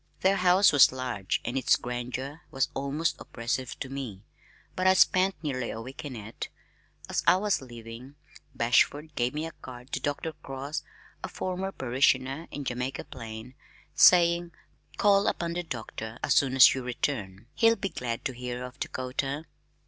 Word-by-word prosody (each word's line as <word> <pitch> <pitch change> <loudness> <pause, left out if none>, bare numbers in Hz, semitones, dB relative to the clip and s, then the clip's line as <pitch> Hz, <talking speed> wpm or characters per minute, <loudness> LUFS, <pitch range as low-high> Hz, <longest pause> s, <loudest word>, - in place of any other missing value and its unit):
Their 195 +1 +3
house 185 +2 +5
was 145 - +7
large 125 -7 -2
and 120 - -3
its 135 - +4
grandeur 125 +5 -5
was 135 -3 0
almost 140 +4 -1
oppressive 120 +1 -4
to - - -3
me, 130 -8 -6 0.5
but 185 0 +1
I 185 - +6
spent 185 0 +4
nearly 130 -5 -2
a 110 - -5
week 130 +4 -8
in 140 -4 -6
it. 110 0 -7 0.6
As - - -1
I - - +8
was 200 -2 +1
leaving, 120 +2 -10 0.4
Bashford 145 +6 +2
gave 125 0 -1
me 155 +1 -2
a 165 - -6
card 125 -2 -12
to - - -1
Dr. 145 +3 -2
Cross, 140 +3 -5 0.4
a - - -2
former 185 +1 -3
parishioner 130 +2 +1
in 145 - -6
Jamaica 125 +1 -3
Plain, 115 -2 -9 0.4
saying, 170 -1 +5 0.4
"Call 200 -1 +4
upon 170 -1 -1
the 175 - -2
Doctor 115 -6 -6
as - - +3
soon 135 -2 +3
as 130 - +9
you 130 - -3
return. 115 -5 -3
He'll 225 0 +4
be 195 - -3
glad 120 -6 -4
to 130 - -1
hear 125 0 -5
of 125 +2 -9
Dakota." 135 +4 -3
135 Hz, 165 wpm, -28 LUFS, 125-160 Hz, 0.6 s, as